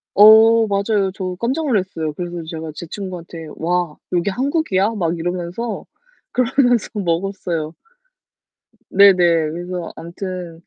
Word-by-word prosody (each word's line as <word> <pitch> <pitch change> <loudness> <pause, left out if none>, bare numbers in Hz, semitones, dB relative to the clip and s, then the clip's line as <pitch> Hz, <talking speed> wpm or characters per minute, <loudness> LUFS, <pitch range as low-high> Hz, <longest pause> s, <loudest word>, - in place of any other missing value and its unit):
어. 220 +2 +7
맞아요. 200 -1 0
저 185 -2 -4
깜짝 265 +7 -1
놀랐어요. 185 - -1
그래서 175 0 -5
제가 160 -1 -6
제 170 - -7
친구한테 170 -3 -7
"와, 175 -2 -1
여기 180 +2 +1
한국이야?" 245 - 0
막 170 -3 -1
이러면서 175 +6 -4 0.5
그러면서 245 -2 +2
먹었어요. 175 -4 -2 1.2
네네. 200 0 +7 0.4
그래서 175 +1 -5
아무튼 175 0 -7
185 Hz, 275 characters per minute, -19 LUFS, 170-210 Hz, 1.2 s, 어